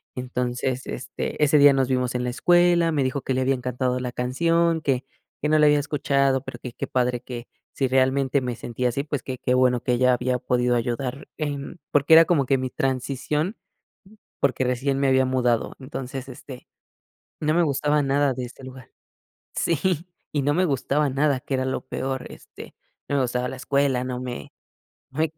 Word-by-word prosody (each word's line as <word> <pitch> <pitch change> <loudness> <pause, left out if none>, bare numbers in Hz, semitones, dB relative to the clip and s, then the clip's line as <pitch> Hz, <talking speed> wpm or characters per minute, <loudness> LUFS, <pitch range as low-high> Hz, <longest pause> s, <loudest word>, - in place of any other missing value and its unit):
Entonces, 125 0 -2
este, 140 +4 -4
ese 150 +1 +5
día 145 -1 +7
nos 135 -2 +1
vimos 125 -1 0
en 125 0 -1
la 125 - -1
escuela, 175 +4 +3
me 145 -4 +1
dijo 135 +2 -1
que 130 - -1
le 130 - 0
había 135 +1 +2
encantado 125 0 -2
la 125 -1 -4
canción, 165 +7 +1
que 135 -4 0 0.4
que 150 - 0
no 155 - +4
la 150 - +6
había 150 0 +5
escuchado, 140 -2 +1
pero, - - -8
que 125 -2 -8
qué - - -4
padre 125 -1 0
que 120 -2 -7 0.3
si 135 - 0
realmente 130 +1 +2
me 125 -2 -3
sentía 120 +1 -2
así, 135 +4 -2
pues, 145 -2 -4
qué 130 -1 -5
qué 125 - 0
bueno 125 -1 +3
que 125 - 0
ella 125 +1 +4
había 125 +1 0
podido 125 0 +1
ayudar 125 +3 -3
en 145 +2 -4
porque, 145 +2 +4
era 165 +1 +9
como 155 -6 +2
que 135 +1 +2
mi 130 0 -2
transición, 135 - -2 0.8
porque, 135 -1 +1
recién 135 +2 0
me 140 - +2
había 130 0 +4
mudado. 125 -3 +1
Entonces, 135 0 -6
este, 125 0 -11 0.7
no 155 0 +1
me 175 - +3
gustaba 150 0 +1
nada 140 0 +2
de 125 0 -4
este 130 +2 -13
lugar. 130 -1 -11 0.7
Sí, 170 0 0 0.3
y 145 - +1
no 145 +2 +1
me 185 +4 +2
gustaba 145 0 0
nada 140 0 +1
que 135 - -6
era 130 - 0
lo 130 - -2
peor, 130 0 -4
este, - - -12 0.3
no 145 - -1
me 140 - +3
gustaba 125 0 -1
la - - -6
escuela, 135 -1 +1
no 125 -1 -4
me 125 -1 -6 0.6
no 135 - -7
me 160 -1 +1
130 Hz, 195 wpm, -24 LUFS, 125-145 Hz, 0.8 s, era